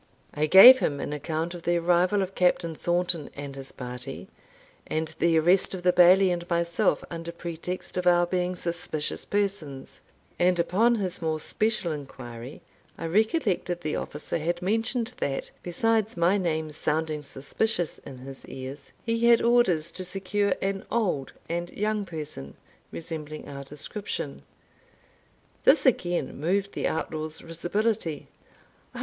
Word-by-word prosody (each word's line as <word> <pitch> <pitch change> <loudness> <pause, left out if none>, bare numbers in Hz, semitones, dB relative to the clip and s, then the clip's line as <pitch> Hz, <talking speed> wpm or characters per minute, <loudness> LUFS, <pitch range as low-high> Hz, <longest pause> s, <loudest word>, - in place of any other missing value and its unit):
I 150 +1 +1
gave 245 - +11
him 145 -9 -1
an 145 - -3
account 160 +3 -3
of 175 - -8
the 175 +1 +1
arrival 180 +4 +3
of 190 0 -6
Captain 180 -2 +2
Thornton 175 -1 0
and 140 -1 -7
his 135 -1 -8
party, 125 +7 -7 0.6
and 160 0 -2
the 170 -1 +3
arrest 180 +4 +3
of 180 - -7
the 180 0 +4
Bailie 185 +2 +6
and 175 0 -3
myself 170 +4 +1
under 165 0 -5
pretext 170 +2 -5
of 180 0 0
our 175 0 +5
being 180 0 -1
suspicious 170 -3 -3
persons; 195 -10 -3 0.4
and 180 0 +3
upon 225 +8 +3
his 185 -5 -3
more 160 -1 -1
special 215 0 0
inquiry, 130 -4 -8 0.3
I - - -5
recollected 195 - +1
the 155 -2 -2
officer 150 +3 -4
had 175 +3 -2
mentioned 225 +4 0
that, 135 -1 -2
besides 220 +3 0
my 170 +3 +3
name 160 -5 -1
sounding 155 0 -1
suspicious 155 +6 -2
in 130 - -10
his 135 +1 -10
ears, 135 +2 -8
he 230 0 +1
had 235 -1 +7
orders 210 -10 +3
to 185 - -5
secure 195 +2 0
an 195 0 -1
old 185 - -1
and 170 +1 -3
young 210 0 -1
person, 150 - -7 0.4
resembling 155 -2 -6
our 140 -1 -7
description. 150 +9 -5 1.2
This 295 - +5
again 175 - +1
moved 195 +6 0
the - - -1
outlaw's 155 0 -3
risibility. 175 0 -2
175 Hz, 145 wpm, -27 LUFS, 155-195 Hz, 1.2 s, gave